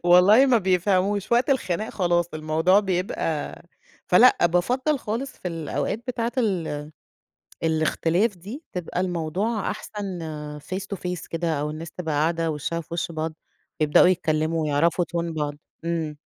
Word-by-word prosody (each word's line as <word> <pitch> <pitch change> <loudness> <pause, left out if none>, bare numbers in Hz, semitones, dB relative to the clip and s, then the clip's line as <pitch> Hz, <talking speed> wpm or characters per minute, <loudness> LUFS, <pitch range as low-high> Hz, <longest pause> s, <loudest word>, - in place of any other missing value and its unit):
والله 190 +9 +7
ما 245 -3 +5
بيفهَموش، 190 +2 +1
وقت 245 +4 +3
الخناق 215 -6 0
خلاص 175 -3 +1
الموضوع 160 +5 +3
بيبقى 180 -5 -2 0.4
فلأ 180 -1 +6
بافضّل 250 - +1
خالص 235 +5 -3
في 180 - -6
الأوقات 165 +5 -2
بتاعة 235 -1 -1
ال 170 -10 -1 0.8
الاختلاف 165 +5 +1
دي، 220 - -8
تبقى 180 0 -3
الموضوع 185 +5 -1
أحسن 205 -3 -6 0.4
face 185 +6 -5
to - - -10
face 180 -2 -4
كده 165 -1 -1
أو 150 - -1
الناس 160 +2 -7
تبقى 160 -4 -4
قاعدة 165 +2 +1
وشهّا 165 +3 -3
في - - -19
وشّ 170 0 -2
بعض، 160 0 -3 0.5
يبدؤوا 150 +4 +6
يتكلموا 160 -2 +1
ويعرفوا 165 +4 +2
Tone 170 -1 -1
بعض، 150 -2 -2 0.3
امم. 160 -3 -2
175 Hz, 140 wpm, -24 LUFS, 160-205 Hz, 0.8 s, والله